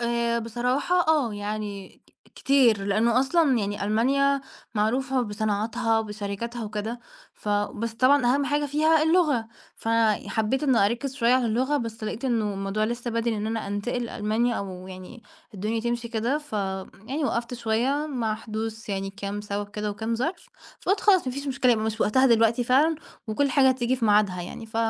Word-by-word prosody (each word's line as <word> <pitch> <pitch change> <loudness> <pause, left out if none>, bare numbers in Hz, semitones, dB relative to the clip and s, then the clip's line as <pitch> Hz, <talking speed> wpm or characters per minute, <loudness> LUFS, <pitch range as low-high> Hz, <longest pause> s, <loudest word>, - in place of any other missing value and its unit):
آآ 235 0 0
بصراحة 250 +10 0
آه 285 -9 +2
يعني 205 -1 -6 0.3
كتير، 245 -7 +3
لأنه 225 +5 +2
أصلًا 275 -1 +3
يعني 205 -1 -2
ألمانيا 275 +6 +2 0.3
معروفة 255 +5 +1
بصناعاتها 220 +2 0
وبشركاتها 215 +2 -4
وكده، 215 +3 -4 0.3
ف - - -8
بس 205 +2 -1
طبعًا 255 +2 +4
أهم 285 0 +1
حاجة 290 +1 0
فيها 310 +2 +3
اللغة، 310 -8 +2 0.3
فحبيت 225 +2 0
إني 265 -5 +3
أركز 240 +5 -2
شوية 245 -2 +3
على 255 -2 +2
اللغة 255 +6 +1
بس 225 -4 -4
لقيت 220 +4 -4
إنه 220 -5 0
الموضوع 195 +2 -1
لسّا 240 +2 -3
بدري 230 0 0
إن 210 +1 -3
أنا 225 0 -3
انتقل 205 +5 -2
لألمانيا 225 +2 0
أو 185 -2 -6
يعني 185 +6 -10 0.3
الدنيا 215 +4 -2
تمشي 235 0 -2
كده، 235 +5 0
ف 295 -4 -16 0.5
يعني 280 +5 -2
وقفت 235 -1 -2
شوية 245 +6 0
مع 230 -5 -1
حدوث 220 0 -6
يعني 195 -1 -2
كام 200 +1 -5
سبب 205 0 -4
كده 210 0 -3
وكام 220 +3 -3
ظرف، 310 - -3 0.3
فقُلت 390 +2 +1
خلاص 380 -7 +4
ما 255 - -1
فيش 280 +2 -5
مشكلة 260 -2 +3
يبقى 220 -2 0
مش 220 0 -3
وقتها 260 +5 +4
دلوقتي 230 0 +3
فعلًا 280 +7 +4 0.3
وكل 275 +6 +1
حاجة 265 0 +5
هتيجي 255 -1 +1
في 240 - -2
ميعادها 205 -4 +3
يعني، 200 +5 -8
ف 220 - -8
230 Hz, 170 wpm, -25 LUFS, 215-260 Hz, 0.5 s, حاجة